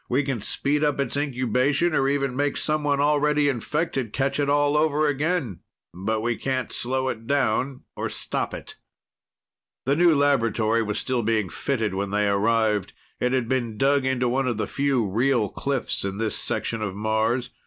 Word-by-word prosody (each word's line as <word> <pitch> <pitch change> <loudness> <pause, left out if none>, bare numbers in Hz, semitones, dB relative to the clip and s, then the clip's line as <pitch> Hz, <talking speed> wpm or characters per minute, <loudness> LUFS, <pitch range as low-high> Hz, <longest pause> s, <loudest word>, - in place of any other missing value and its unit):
We 135 +4 +2
can 135 -5 -2
speed 145 +7 0
up 145 -2 +1
its 140 - -1
incubation 140 +3 +1
or 135 -2 +2
even 140 -2 0
make 145 +1 0
someone 150 -2 0
already 150 0 +3
infected 135 -2 -2
catch 140 +1 0
it 140 -1 +1
all 145 0 +3
over 155 0 +2
again. 145 - -1 0.3
But 110 +5 -2
we 120 +1 -1
can't 130 -3 -2
slow 130 +2 -1
it 115 -2 -6
down 135 -1 0
or - - -3
stop - - -3
it." - - -9 1.1
The 135 +2 +2
new 170 0 +5
laboratory 115 -5 +2
was 105 -1 -2
still 125 -2 -1
being 110 -3 0
fitted 110 -4 -2
when 100 +1 -2
they 105 +1 +1
arrived. 105 0 +1 0.3
It 125 - +1
had 130 -3 0
been 120 -4 -1
dug 140 +3 +3
into 130 -1 +1
one 130 +2 0
of 120 -3 -1
the 110 - -1
few 135 -1 0
real 115 +2 +1
cliffs 140 +3 -2
in 100 0 -3
this 110 -1 -1
section 115 -1 -2
of 100 -3 -3
Mars. 110 +4 0
130 Hz, 175 wpm, -24 LUFS, 110-140 Hz, 1.1 s, new